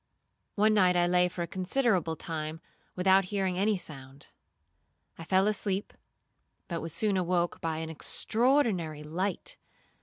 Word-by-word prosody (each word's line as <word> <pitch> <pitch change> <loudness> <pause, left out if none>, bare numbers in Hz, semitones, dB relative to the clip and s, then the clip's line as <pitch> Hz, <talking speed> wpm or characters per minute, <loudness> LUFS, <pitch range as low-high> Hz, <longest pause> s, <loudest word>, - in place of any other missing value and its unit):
'One 215 +1 +4
night 185 -4 +4
I 175 0 +3
lay 180 0 +3
for 175 0 -4
a - - -5
considerable 185 - 0
time 155 -1 -5 0.4
without 190 +1 +4
hearing 190 -2 -1
any 205 +1 +2
sound. 135 -5 -8 0.9
I - - -6
fell 190 +3 +2
asleep, 205 -1 -1 0.7
but 170 -2 -4
was 165 - -5
soon 205 +3 0
awoke 175 -1 0
by 160 -1 -2
an 160 0 -4
extraordinary 205 - +1
light. 180 +5 -3
180 Hz, 140 wpm, -29 LUFS, 165-200 Hz, 0.9 s, One